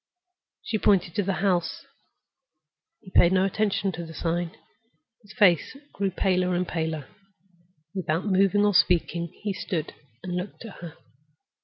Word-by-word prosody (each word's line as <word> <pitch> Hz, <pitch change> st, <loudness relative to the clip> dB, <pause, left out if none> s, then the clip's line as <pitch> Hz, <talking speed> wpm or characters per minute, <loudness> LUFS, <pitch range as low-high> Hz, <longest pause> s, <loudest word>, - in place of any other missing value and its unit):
She 215 Hz, -, -2 dB
pointed 180 Hz, -5 st, +3 dB
to 205 Hz, -, +1 dB
the 195 Hz, 0 st, -1 dB
house. 175 Hz, -4 st, 0 dB, 1.2 s
He 190 Hz, -4 st, -14 dB
paid 175 Hz, -, +5 dB
no 190 Hz, 0 st, +4 dB
attention 200 Hz, 0 st, 0 dB
to 170 Hz, 0 st, -6 dB
the 165 Hz, -1 st, -10 dB
sign. 170 Hz, +2 st, -1 dB, 0.7 s
His 205 Hz, -2 st, -16 dB
face 200 Hz, -, +3 dB, 0.2 s
grew 195 Hz, -1 st, 0 dB
paler 185 Hz, -1 st, +1 dB
and 180 Hz, 0 st, 0 dB
paler. 160 Hz, -4 st, -3 dB, 0.9 s
Without 170 Hz, -2 st, -1 dB
moving 200 Hz, +1 st, +3 dB
or 205 Hz, -, +3 dB
speaking 170 Hz, -1 st, +2 dB, 0.2 s
he 205 Hz, -2 st, -1 dB
stood 170 Hz, -4 st, -3 dB, 0.3 s
and 180 Hz, -1 st, -4 dB
looked 180 Hz, +5 st, -5 dB
at 215 Hz, -, -10 dB
her. 170 Hz, -3 st, -9 dB
180 Hz, 145 wpm, -26 LUFS, 170-195 Hz, 1.2 s, paid